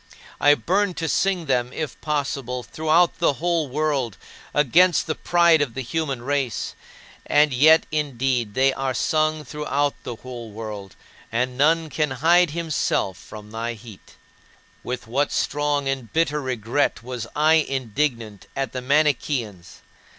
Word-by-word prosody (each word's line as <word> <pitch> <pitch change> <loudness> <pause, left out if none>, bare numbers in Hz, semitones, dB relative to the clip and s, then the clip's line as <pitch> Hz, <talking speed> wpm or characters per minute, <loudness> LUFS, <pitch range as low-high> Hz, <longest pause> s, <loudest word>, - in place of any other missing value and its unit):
I 145 0 +6
burned 190 +3 0
to 165 - -2
sing 185 0 +1
them 125 -3 0
if 155 +1 -5
possible, 140 -4 -2
throughout 160 +5 +1
the 165 - +3
whole 165 0 0
world, 135 -7 -1 0.3
against 165 +5 +4
the 155 - -1
pride 170 -2 +3
of 130 -6 -2
the 130 - -3
human 135 -2 -3
race. 135 -4 -2 0.5
And 150 -1 +4
yet, 155 +5 +6
indeed, 130 -7 -1
they 135 +1 +3
are 135 -1 -2
sung 155 +3 +1
throughout 145 -1 -1
the 120 - -6
whole 120 -1 -9
world, 105 -3 -8 0.4
and 125 +2 -1
none 160 +3 +2
can 150 -1 0
hide 165 +6 +3
himself 155 - -1
from 105 +3 -12
thy 115 +1 -3
heat. 110 -3 -14 0.7
With 125 0 -5
what 135 +6 0
strong 145 -1 0
and 135 -4 -3
bitter 150 -2 +1
regret 125 0 -1
was 125 -2 -5
I 155 +2 +4
indignant 125 -6 -2
at 135 -1 -2
the 130 - -4
Manicheans! 130 - 0
140 Hz, 145 wpm, -23 LUFS, 120-155 Hz, 0.7 s, I